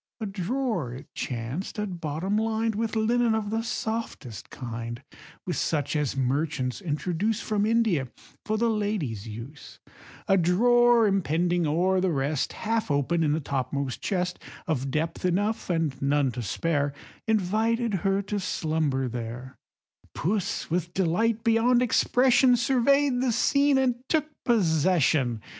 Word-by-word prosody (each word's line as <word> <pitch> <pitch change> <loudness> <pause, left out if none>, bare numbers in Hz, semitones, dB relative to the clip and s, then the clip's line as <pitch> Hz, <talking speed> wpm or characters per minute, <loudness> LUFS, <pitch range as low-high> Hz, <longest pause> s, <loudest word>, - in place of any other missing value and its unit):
A 220 - -3
drawer, 195 - -2
it 130 - -12
chanced, 125 - -4
at 190 -5 -4
bottom 165 +6 -2
lined 220 +1 0
With 225 +1 -2
linen 230 +1 +2
of 215 -2 -2
the 225 +1 0
softest 220 - -4
kind, 120 0 -6 0.4
With 180 - -2
such 145 -2 -1
as 145 -3 -1
merchants 135 +1 -1
introduce 180 +6 -1
From 210 -1 0
India, 220 - +2 0.4
for 215 0 -1
the 235 +2 +2
ladies' 195 - -2
use, 115 +7 -10 0.5
A 195 -2 +4
drawer 240 +6 +4
impending 175 -3 +1
o'er 180 +5 +2
the 190 - +1
rest, 145 -1 -1
Half 225 -3 -2
open 145 +4 +1
in 155 -2 +2
the 155 - 0
topmost 135 -2 -3
chest, 180 -2 -2 0.3
Of 135 -4 -1
depth 160 +4 -2
enough, 205 +5 0
and 165 -5 0
none 140 -1 +2
to 120 +1 -5
spare, 145 +4 -1 0.3
Invited 220 +3 +1
her 195 0 +1
to 205 +1 -3
slumber 155 -7 -1
there; 120 +2 -6 0.6
Puss 190 -1 -2
with 175 0 -2
delight 215 +6 +1
beyond 240 +2 +3
expression, 250 +1 +4
Survey'd 265 +2 +2
the 255 -2 +1
scene, 280 +4 +3
and 255 -2 +2
took 310 -2 +2 0.2
possession. 160 - +2
180 Hz, 140 wpm, -26 LUFS, 145-225 Hz, 0.6 s, A